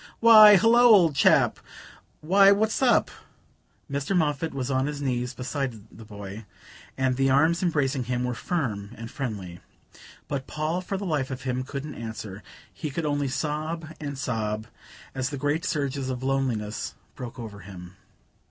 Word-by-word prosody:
"Why, 215 Hz, -2 st, +9 dB
hullo, 225 Hz, +5 st, +4 dB
old 205 Hz, -10 st, +6 dB
chap -, -, +4 dB, 0.6 s
why, 195 Hz, +5 st, +6 dB
what's 215 Hz, +4 st, +1 dB
up?" 255 Hz, -3 st, +3 dB, 0.8 s
Mr. 140 Hz, +7 st, -1 dB
Moffatt 155 Hz, 0 st, 0 dB
was 135 Hz, 0 st, -3 dB
on 130 Hz, +1 st, +1 dB
his 150 Hz, -1 st, -4 dB
knees 125 Hz, -3 st, -2 dB
beside 125 Hz, -5 st, -5 dB
the 115 Hz, -, -11 dB
boy, 105 Hz, 0 st, -9 dB, 0.5 s
and 130 Hz, -1 st, 0 dB
the 135 Hz, 0 st, +2 dB
arms 160 Hz, +6 st, +3 dB
embracing 145 Hz, -7 st, 0 dB
him 125 Hz, 0 st, -2 dB
were 125 Hz, 0 st, -1 dB
firm 115 Hz, -, -3 dB
and 115 Hz, +1 st, -8 dB
friendly. 100 Hz, -10 st, -5 dB, 0.7 s
But 135 Hz, -2 st, -4 dB
Paul, 155 Hz, +4 st, -2 dB
for 195 Hz, +2 st, -4 dB
the 200 Hz, -, -5 dB
life 150 Hz, -7 st, -1 dB
of 130 Hz, -1 st, -6 dB
him, 130 Hz, -1 st, -2 dB
couldn't 140 Hz, +2 st, -6 dB
answer: 110 Hz, -3 st, -7 dB, 0.3 s
he 155 Hz, -, -5 dB
could 160 Hz, +3 st, -3 dB
only 145 Hz, -1 st, 0 dB
sob 155 Hz, +3 st, -3 dB
and 140 Hz, -2 st, -5 dB
sob 110 Hz, -4 st, -2 dB, 0.5 s
as 130 Hz, -1 st, -2 dB
the 145 Hz, -, -5 dB
great 145 Hz, +4 st, -1 dB
surges 140 Hz, -3 st, -2 dB
of 130 Hz, 0 st, -4 dB
loneliness 125 Hz, -6 st, -2 dB, 0.2 s
broke 125 Hz, -1 st, -8 dB
over 110 Hz, -4 st, -8 dB
him. 90 Hz, -1 st, -11 dB
135 Hz, 160 wpm, -26 LUFS, 120-155 Hz, 0.8 s, Why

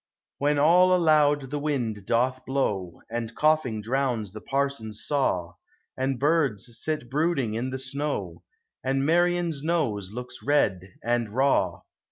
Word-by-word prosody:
When 145 Hz, +1 st, +2 dB
all 180 Hz, +5 st, +5 dB
aloud 150 Hz, -5 st, +3 dB
the 145 Hz, -, -2 dB
wind 120 Hz, -9 st, -2 dB
doth 130 Hz, +2 st, +1 dB
blow. 100 Hz, -10 st, -2 dB
And 115 Hz, -1 st, -4 dB
coughing 155 Hz, -8 st, +2 dB
drowns 120 Hz, -3 st, -1 dB
the 110 Hz, +1 st, -9 dB
parson's 135 Hz, -6 st, -2 dB
saw, 95 Hz, -, 0 dB, 0.4 s
And 130 Hz, -1 st, -1 dB
birds 135 Hz, -7 st, +1 dB
sit 155 Hz, -6 st, -2 dB
brooding 140 Hz, -4 st, 0 dB
in 120 Hz, +4 st, -2 dB
the 130 Hz, -, -3 dB
snow, 140 Hz, +3 st, -3 dB, 0.4 s
And 135 Hz, +1 st, 0 dB
Marian's 175 Hz, -1 st, +2 dB
nose 140 Hz, -, -1 dB
looks 125 Hz, +2 st, -7 dB
red 95 Hz, -10 st, +1 dB
and 120 Hz, -1 st, 0 dB
raw. 135 Hz, +6 st, +1 dB
135 Hz, 135 wpm, -26 LUFS, 115-150 Hz, 0.4 s, all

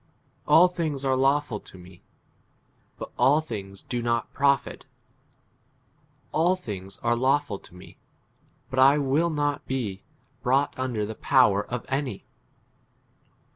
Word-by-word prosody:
12 -, -, +5 dB
All 180 Hz, -, +7 dB
things 155 Hz, -6 st, -3 dB
are 130 Hz, -1 st, +2 dB
lawful 135 Hz, -3 st, +1 dB
to 95 Hz, -, -14 dB
me, 90 Hz, 0 st, -15 dB, 1.0 s
but -, -, -8 dB
all 145 Hz, +3 st, +5 dB
things 100 Hz, -10 st, -7 dB
do 120 Hz, -1 st, -3 dB
not 115 Hz, -1 st, -1 dB
profit; 140 Hz, -2 st, 0 dB, 1.4 s
all 175 Hz, +4 st, +2 dB
things 100 Hz, -, -7 dB
are 120 Hz, 0 st, +2 dB
lawful 130 Hz, -4 st, +1 dB
to -, -, -17 dB
me, 90 Hz, +1 st, -14 dB, 0.7 s
but 130 Hz, -, -5 dB, 0.2 s
J -, -, 0 dB
will 145 Hz, +4 st, +1 dB
not 145 Hz, -2 st, -1 dB
be 110 Hz, -8 st, -3 dB, 0.4 s
brought 135 Hz, +3 st, +1 dB
under 125 Hz, -5 st, -2 dB
the 110 Hz, -, -5 dB
power 100 Hz, -1 st, +3 dB
of 125 Hz, -1 st, -5 dB
any. 135 Hz, -6 st, -3 dB
130 Hz, 135 wpm, -26 LUFS, 105-145 Hz, 1.4 s, All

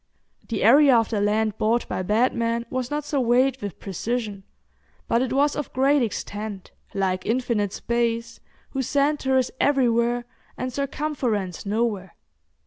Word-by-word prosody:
The 225 Hz, -3 st, -2 dB
area 270 Hz, +3 st, +7 dB
of 225 Hz, 0 st, +1 dB
the 210 Hz, -2 st, 0 dB
land 215 Hz, +1 st, +1 dB
bought 230 Hz, +3 st, +1 dB
by -, -, -2 dB
Batman 230 Hz, +3 st, +1 dB
was 255 Hz, -1 st, -2 dB
not 295 Hz, 0 st, -2 dB
surveyed 260 Hz, -2 st, +2 dB
with 200 Hz, -4 st, -6 dB
precision, 210 Hz, +1 st, -3 dB, 0.7 s
but 235 Hz, -, +2 dB
it 255 Hz, -2 st, -1 dB
was 285 Hz, +2 st, +2 dB
of 295 Hz, -, -4 dB
great 275 Hz, +2 st, +3 dB
extent, 210 Hz, -3 st, -4 dB, 0.2 s
like 190 Hz, -2 st, 0 dB
infinite 230 Hz, -4 st, 0 dB
space, 235 Hz, 0 st, -2 dB, 0.3 s
whose 265 Hz, -3 st, -2 dB
centre 280 Hz, -2 st, +2 dB
is 255 Hz, -1 st, +1 dB
everywhere, 240 Hz, -3 st, +2 dB, 0.3 s
and 255 Hz, 0 st, -4 dB
circumference 260 Hz, -, -2 dB
nowhere. 205 Hz, -4 st, -1 dB
235 Hz, 135 wpm, -24 LUFS, 215-265 Hz, 0.7 s, area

